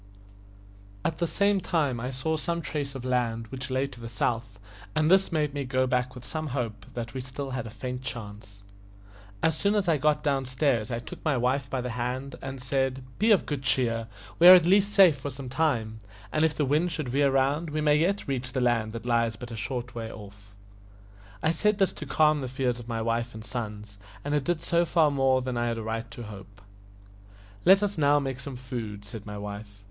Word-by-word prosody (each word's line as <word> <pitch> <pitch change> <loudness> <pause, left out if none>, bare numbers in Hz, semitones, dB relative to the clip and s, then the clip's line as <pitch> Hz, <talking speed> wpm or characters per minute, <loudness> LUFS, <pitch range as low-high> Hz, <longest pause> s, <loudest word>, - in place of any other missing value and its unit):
At 160 - -1
the 170 - +1
same 200 +2 +2
time 145 -10 0
I 125 +2 -3
saw 135 +5 -1
some 170 +2 -2
trace 145 -3 -3
of 130 -1 -6
land, 120 -3 0
which 130 0 -6
lay 130 +1 +1
to 130 - -10
the 115 - -6
south, 115 -1 -2 0.4
and 155 +2 +3
this 190 0 +4
made 150 -3 0
me 145 -1 -2
go 130 0 +1
back 125 0 0
with 125 -1 -10
some 155 +4 -4
hope 105 -5 -4
that 120 -1 -5
we 130 - -3
had 130 - -10
still 135 +1 -5
a 125 -3 -4
faint 125 +3 -5
chance. 105 -5 -8 0.8
As 160 -1 +3
soon 200 +5 +1
as 200 -3 +1
I 165 -3 +4
got 150 +1 +2
down 135 -3 0
stairs 130 -4 +1
I 115 - -2
took 120 - -9
my 150 -5 +1
wife 130 +2 0
by 130 -1 -1
the 125 0 -4
hand, 125 +3 -3
and 135 0 -6
said, 130 0 -1 0.2
"Be 220 - +3
of 210 -4 +5
good 145 -3 -3
cheer, 115 -4 0 0.3
we 175 - +8
are 185 - +13
at 175 -3 +5
least 200 +3 +4
safe 180 -9 +6
for 145 - -4
some 130 -1 -7
time, 120 -7 0 0.3
and 155 - +1
if 160 -1 +2
the 150 - +1
wind 155 +6 +2
should 155 -5 -3
veer 140 +2 +3
round, 140 +5 +1
we 155 +1 -2
may 150 -1 +4
yet 190 +6 0
reach 130 -1 -3
the 135 - 0
land 115 -3 +1
that 115 0 -6
lies 115 -2 +1
but 120 +3 -9
a - - -5
short 120 +3 -4
way 115 -1 -5
off." 100 -1 -13 0.9
I 160 - +4
said 210 +5 +2
this 195 -2 +2
to 150 - -8
calm 150 0 +3
the 130 - -3
fears 125 -1 -1
of 120 - -10
my 115 -1 -2
wife 115 0 -1
and 110 0 -8
sons, 105 -4 -6 0.3
and 145 - -1
it 145 -2 +1
did 175 -2 -1
so 170 0 +2
far 160 -3 +3
more 135 -2 +2
than 125 -1 -3
I 120 0 0
had 115 -1 -1
a 115 - -4
right 115 +1 -3
to 115 +1 -8
hope. 100 -1 -11 1.0
"Let 195 +2 +7
us 205 -4 -1
now 145 0 +5
take 135 -2 -3
some 135 0 -7
food," 115 -5 -6
said 105 +1 -9
my 105 0 -6
wife. 100 0 -7
130 Hz, 225 wpm, -27 LUFS, 115-150 Hz, 1.0 s, are